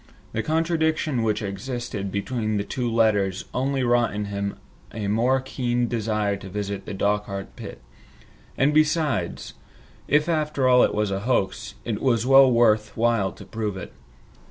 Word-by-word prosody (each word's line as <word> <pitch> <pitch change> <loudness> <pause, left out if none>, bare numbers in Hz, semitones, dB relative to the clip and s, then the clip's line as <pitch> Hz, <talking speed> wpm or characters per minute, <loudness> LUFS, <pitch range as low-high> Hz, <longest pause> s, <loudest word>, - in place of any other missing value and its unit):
The 110 - -1
contradiction 160 -3 0
which 110 -1 0
existed 100 -1 -4
between 110 +1 -2
the 100 - -1
two 120 +2 -3
letters 105 -4 +1
only 135 +1 0
wrought 120 -3 +2
in 105 0 -2
him 100 0 -4 0.3
a 105 -2 -4
more 120 +6 +2
keen 125 -2 -1
desire 105 -3 -1
to 95 0 -10
visit 100 0 -4
the 105 - -4
Dochart 100 -1 -2
pit. - - -9 0.7
And 140 +3 +3
besides, 155 - +1 0.5
if 150 +2 +3
after 150 -5 0
all 125 -1 +6
it - - +2
was 105 -1 0
a 95 - -1
hoax, 105 -2 -1
it 110 -3 -3
was 120 -4 +2
well 135 0 +7
worth 110 -3 +3
while 115 -4 +2
to - - -12
prove 105 -3 -4
it. 95 - -8
115 Hz, 155 wpm, -24 LUFS, 100-130 Hz, 0.7 s, well